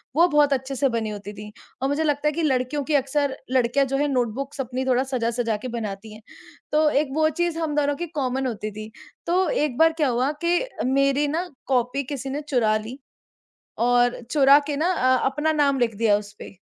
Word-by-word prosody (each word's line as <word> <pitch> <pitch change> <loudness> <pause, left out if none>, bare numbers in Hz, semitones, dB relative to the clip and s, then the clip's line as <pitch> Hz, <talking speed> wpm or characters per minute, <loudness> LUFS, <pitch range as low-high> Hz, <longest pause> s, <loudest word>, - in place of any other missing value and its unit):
वो 340 +3 +5
बहुत 295 -3 +3
अच्छे 265 +1 -3
से 270 +2 +2
बनी 230 -2 -2
होती 205 0 -7
थी। 210 +1 -10 0.3
और 270 - 0
मुझे 300 +3 0
लगता 295 -1 0
है - - +3
कि 335 - -2
लड़कियों 275 0 0
की 310 - -3
अक्सर 280 0 0 0.2
लड़कियाँ 260 +2 +2
जो 270 - -1
हैं 290 +1 +1
नोटबुक्स 270 +2 -2
अपनी 255 +1 -4
थोड़ा 255 0 +2
सजा-सजा 235 -3 -1
के 240 +5 -7
बनाती 210 -1 -6
हैं। 215 - -13 0.5
तो 305 0 +3
एक 295 0 +1
वो 310 0 +3
चीज़ 340 -1 0
हम 315 -3 -2
दोनों 290 -1 +1
की 345 +4 -5
कॉमन 265 -2 -1
होती 215 -3 -4
थी। 215 +1 -9 0.4
तो 360 0 +2
एक 290 -5 -1
बार 325 0 +5
क्या 290 - +4
हुआ 250 +3 +1
कि 345 +1 +3 0.3
मेरी 275 +2 +2
ना 360 +2 -2 0.2
कॉपी 255 +1 0
किसी 275 0 -5
ने 285 +3 -3
चुरा 220 -5 +2
ली, 225 +5 -8 0.8
और 245 +1 +2
चुरा 280 -1 +6
के 290 - -2
ना 320 +4 +1
अ, 255 -4 +3
अपना 300 +3 0
नाम 280 -2 +2
लिख 230 -3 0
दिया 210 -1 +3
उसपे। 205 -1 -11
270 Hz, 210 wpm, -23 LUFS, 240-295 Hz, 0.8 s, चुरा